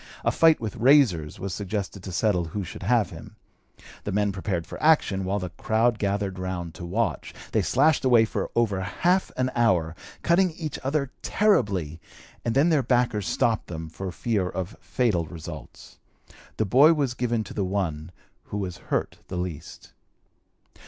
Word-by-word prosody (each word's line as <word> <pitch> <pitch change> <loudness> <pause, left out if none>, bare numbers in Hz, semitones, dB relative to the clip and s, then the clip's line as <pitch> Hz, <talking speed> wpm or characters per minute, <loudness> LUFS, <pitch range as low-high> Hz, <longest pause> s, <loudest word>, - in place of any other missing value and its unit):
A - - +4
fight 165 -1 +5
with 110 -3 -5
razors 115 - +4
was 95 -1 -4
suggested 100 0 -4
to 95 - -7
settle 90 -1 +1
who 100 +5 -4
should 90 - -8
have 110 +3 +2
him. - - -11 0.7
The - - -3
men 105 +1 +1
prepared 95 -3 -3
for - - -9
action, 130 -12 +3
while 100 +2 0
the 90 -3 -4
crowd 110 +5 +1
gathered 100 -2 -1
round 90 -3 -4
to 85 - -8
watch. - - -2 0.2
They - - +2
slashed 145 +4 +3
away 120 -4 +5
for - - -3
over 105 -5 +1
half 175 - +1
an 130 0 0
hour, 90 -9 +2 0.3
cutting 175 0 +3
each 155 -3 -5
other 140 0 -1
terribly, 95 - +1 0.4
and 115 0 -1
then 145 +5 +4
their 155 -4 +3
backers 120 -5 +1
stopped 115 -2 +1
them 80 -1 -6
for 95 +3 -6
fear 100 -1 -1
of 95 -1 -5
fatal 100 -10 0
results. 80 -1 -10 0.6
The 110 - +1
boy 140 - +6
was 140 -5 0
given 120 -3 -1
to - - -10
the 100 - -1
one 90 -5 -2 0.4
who 105 - -5
was 90 -3 -4
hurt - - -1
the 90 - -5
least. 85 -3 -6
105 Hz, 170 wpm, -25 LUFS, 90-125 Hz, 0.7 s, boy